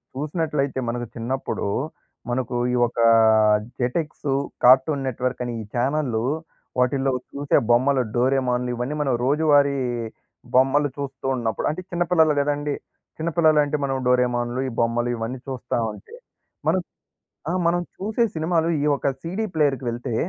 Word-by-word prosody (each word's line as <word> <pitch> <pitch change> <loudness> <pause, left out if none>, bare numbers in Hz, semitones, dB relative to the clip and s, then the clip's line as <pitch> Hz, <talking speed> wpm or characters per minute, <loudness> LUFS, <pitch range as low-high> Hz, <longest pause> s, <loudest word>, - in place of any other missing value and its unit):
చూసినట్లయితే 145 -2 -1
మనకు 120 0 -3
చిన్నప్పుడు 120 -1 -3 0.6
మనకు 125 0 -2 0.2
ఈ - - +2
ఒక 120 - -14 0.8
జెటెక్సు, 140 +2 -1 0.3
కార్టూన్ 135 +2 +5
నెట్‌వర్క్ 125 0 -2
అని 120 - -4
ఈ - - -6
చానెల్‌లు, 125 -2 0 0.5
వాటిలో 135 +1 +2 0.2
చూసే 145 0 +1
బొమ్మలు, 130 +2 +3
డోరేమోన్‌లు, 125 -1 +1
ఇయన్నీ 125 +5 -3
మనం 135 -3 +1
రోజువారీ 145 -1 +3 0.8
బొమ్మలు 135 +3 +4
చూస్తున్నప్పుడు 130 -5 -2
అంటే, 170 +4 -5
చిన్నపిల్లలు 175 -3 +3
కదండీ! 145 0 -1 0.4
చిన్నపిల్లలు 160 -1 +3
అంటే, 145 +1 -1
మనం 135 -1 -1
డోరేమోన్‌లు, 125 -1 +1
ఈ - - -8
బొమ్మలు 120 +1 0
ఇవన్నీ 120 +3 -4
చూస్తావుంటే, 120 - -4 0.5
మనం - - +2 0.7
ఆ! - - 0
మనం 175 +1 +2 0.2
చూసే 220 +4 0
సినిమాలు 165 +1 +1
ఈ - - +1
ఒక 140 0 0
సీడీ 185 +7 -3
ప్లేయర్‌కెళ్తే 130 -5 0
135 Hz, 120 wpm, -23 LUFS, 125-150 Hz, 0.8 s, కార్టూన్